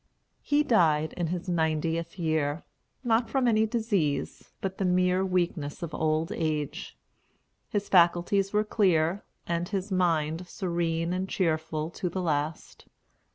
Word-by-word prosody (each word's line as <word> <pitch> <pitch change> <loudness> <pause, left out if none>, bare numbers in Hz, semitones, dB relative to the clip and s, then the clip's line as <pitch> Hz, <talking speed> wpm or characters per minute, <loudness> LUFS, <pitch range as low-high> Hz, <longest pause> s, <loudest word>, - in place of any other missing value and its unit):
He 295 +1 +2
died 160 - +3
in 175 -2 -2
his 180 +3 -4
ninetieth 165 0 -1
year; 155 -2 0 0.4
not 230 -1 +2
from 265 -2 +1
any 220 -1 +3
disease, 200 - -1
but 190 -1 -4
the - - +1
mere 180 0 +2
weakness 175 -4 -1
of 165 -2 -5
old 155 +1 0
age. 155 -3 -3 0.7
His 205 -1 -2
faculties 180 +2 +3
were 210 0 +2
clear, 185 -4 +2 0.2
and 170 +1 -2
his 195 0 -3
mind 170 -2 +1
serene 170 -2 -1
and 185 +1 -2
cheerful 160 -2 -1
to 180 - -3
the 185 - -4
last. 150 -1 -3
175 Hz, 135 wpm, -28 LUFS, 160-190 Hz, 0.7 s, died